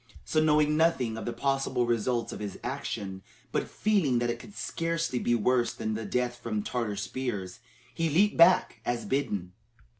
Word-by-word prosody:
So, 155 - +2
knowing 150 -1 +4
nothing 150 -8 +2
of 110 - -6
the 120 - -1
possible 135 0 0
results 120 0 0
of - - -7
his 105 -2 -5
action, 95 -1 -4 0.3
but - - -1
feeling 190 - +2
that 120 0 +1
it 120 - -5
could 200 - -13
scarcely 165 -5 -1
be 120 - +2
worse 120 +1 +2
than 110 -1 -2 0.2
death 125 -1 0
from 110 -3 -3
Tartar 115 -4 -2
spears, 105 -2 -4 0.3
he 165 -1 0
leaped 195 +8 +3
back, 170 +2 +5
as 120 -1 -2
bidden. 100 -10 -1
125 Hz, 170 wpm, -29 LUFS, 115-150 Hz, 0.3 s, back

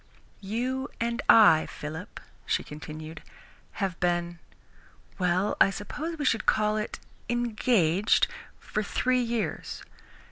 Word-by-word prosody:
"You 250 +7 -2
and 235 0 -1
I, 205 -8 +7
Philip," 160 +7 -7 0.3
she - - +1
continued, 155 +1 -8 0.5
"have 190 -4 -3
been 175 -1 0 0.8
well, 185 +2 +1
I - - +7
suppose 300 - -5
we 295 - -3
should 225 -4 +1
call 215 0 +3
it 215 0 -3 0.3
engaged 220 -6 +2 0.3
for 215 - -3
three 250 +4 +1
years. 235 -2 -3
210 Hz, 110 wpm, -27 LUFS, 175-235 Hz, 0.8 s, I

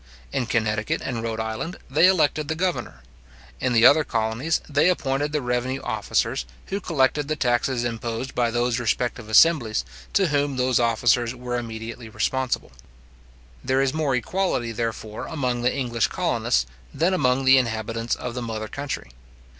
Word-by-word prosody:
In 125 - -1
Connecticut 110 -2 0
and 120 -3 -2
Rhode 115 -1 -3
Island, 110 +11 -4
they 150 +7 +5
elected 155 -5 +2
the 160 - -1
governor. 175 - -2 0.6
In 130 - 0
the 115 0 +5
other 155 +4 +7
colonies, 115 +6 -1
they 150 +4 +3
appointed 145 -4 0
the 150 -3 -1
revenue 125 +2 -1
officers, 110 - -1 0.3
who 200 +1 -2
collected 145 -3 +1
the 155 - -1
taxes 125 -2 +1
imposed 120 +2 -3
by 120 -1 +1
those 120 +1 0
respective 120 -1 -1
assemblies, 115 - +4 0.3
to 190 -4 +3
whom 145 -1 0
those 125 -1 +2
officers 120 +1 +2
were 125 0 -4
immediately 115 0 -7
responsible. 125 +4 -1 0.9
There 130 +1 +1
is 135 0 0
more 155 -4 0
equality, 125 -3 -1
therefore, 110 -1 -4
among 125 -6 -2
the 125 - +2
English 120 -5 0
colonists 65 0 0 0.3
than 165 +6 +1
among 130 -6 +2
the 130 0 +7
inhabitants 115 -1 -2
of 125 -1 -5
the 125 - -4
mother 110 -2 -4
country. 140 - -5
125 Hz, 155 wpm, -24 LUFS, 115-140 Hz, 0.9 s, other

